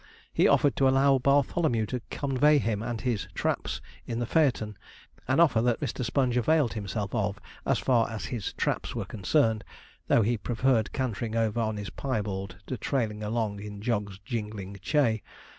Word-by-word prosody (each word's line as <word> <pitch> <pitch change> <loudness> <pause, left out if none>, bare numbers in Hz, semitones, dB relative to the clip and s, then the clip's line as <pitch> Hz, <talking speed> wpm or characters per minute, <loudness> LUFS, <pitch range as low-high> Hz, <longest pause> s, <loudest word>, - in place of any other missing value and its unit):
He - - +4
offered 145 - +4
to 135 - +4
allow 135 0 +4
Bartholomew 140 -2 +2
to 125 +3 -4
convey 145 +2 +3
him 110 -6 0
and 115 0 -3
his 120 -4 -1
'traps' - - -1 0.3
in 115 - -3
the 120 - -1
phaeton 125 -7 +1 0.5
an 130 +4 +2
offer 135 -10 +5
that 120 -1 +1
Mr. 130 -2 -3
Sponge 125 +1 +1
availed 145 +1 +3
himself 100 -2 -4
of 105 -2 -1 0.3
as - - +3
far 120 -3 +2
as 110 -2 -5
his 120 -7 -3
'traps' - - -2
were - - -2
concerned, 110 - +1 0.4
though 115 - +4
he 115 +1 +1
preferred 120 -1 +1
cantering 115 -3 -2
over 115 0 +1
on 110 -2 -1
his 105 -1 -5
piebald 100 -7 -3
to 130 - -4
trailing 110 -6 -1
along 105 -1 -1
in 105 0 -7
Jog's 105 -3 -2
jingling 105 -3 -5
chay. 115 -1 +2
115 Hz, 170 wpm, -28 LUFS, 105-130 Hz, 0.5 s, offer